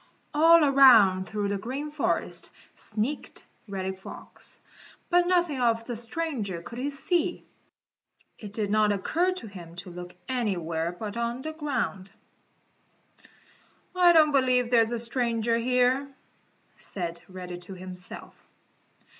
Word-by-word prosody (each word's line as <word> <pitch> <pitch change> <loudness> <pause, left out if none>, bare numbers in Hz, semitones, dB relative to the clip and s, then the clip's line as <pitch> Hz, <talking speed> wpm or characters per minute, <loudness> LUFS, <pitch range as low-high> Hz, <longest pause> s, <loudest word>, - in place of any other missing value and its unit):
All 325 +2 +7
around 230 -10 +6
through 205 -1 -2
the 200 -1 -1
Green 270 +8 -4
Forest 300 -1 -2 0.2
sneaked 225 +7 -4 0.2
Reddy 190 -1 -3
Fox, 190 - -10 0.5
but 350 0 +4
nothing 350 -7 +2
of 230 -1 +2
the 240 - -4
stranger 230 - -3
could 235 - -8
he 275 +3 -1
see. 340 +5 -1 0.9
It 205 -3 -8
didn't 215 0 +2
occur 330 - +1
to 365 - -6
him 175 -5 -10
to 180 +1 -8
look 180 0 -9
anywhere 175 -10 -1
but 205 +4 -6
on 235 +2 -2
the 315 - -4
ground. 255 - -3 1.9
"I 355 -1 +6
don't 310 -2 +6
believe 255 -3 +2
there 235 -2 +6
is 225 +1 +1
a 240 - -1
stranger 230 -1 0
here," 250 +3 +2 0.7
said 170 -3 -5
Reddy 180 -1 -7
to 180 +2 -4
himself. 180 0 -9
230 Hz, 130 wpm, -27 LUFS, 190-275 Hz, 1.9 s, All